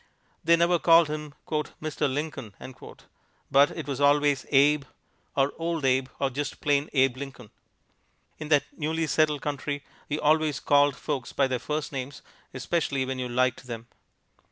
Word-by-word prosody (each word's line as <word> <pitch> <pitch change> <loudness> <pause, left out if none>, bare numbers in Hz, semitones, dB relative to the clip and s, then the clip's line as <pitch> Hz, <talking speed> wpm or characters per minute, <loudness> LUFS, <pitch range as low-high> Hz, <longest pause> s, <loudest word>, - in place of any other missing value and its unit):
They 170 +1 +5
never 170 +1 +3
called 165 -1 +5
him 150 -1 -5 0.4
"Mister 155 -1 -1
Lincoln," 135 -6 -4 1.0
but 140 +1 +6
it 155 -4 -7
was 140 -1 -3
always 145 -1 +3
Abe, 145 +1 +4 0.5
or 140 0 +2
Old 165 -3 -2
Abe, 130 0 +2
or 135 -1 0
just 145 +2 -4
plain 145 0 +1
Abe 135 -2 +2
Lincoln. 130 -5 -9 0.9
In 155 - -6
that 145 -2 +4
newly 160 +1 -1
settled 150 -2 +1
country 145 0 -3 0.3
you 150 +1 -1
always 155 -2 +2
called 145 -1 +3
folks 140 -5 -4
by 140 - +2
their 130 -2 -1
first 150 +4 -3
names, 135 0 -6 0.3
especially 135 0 -1
when 130 0 -4
you 125 -1 -3
liked 125 +1 0
them. 115 -1 -6
145 Hz, 155 wpm, -27 LUFS, 135-150 Hz, 1.0 s, but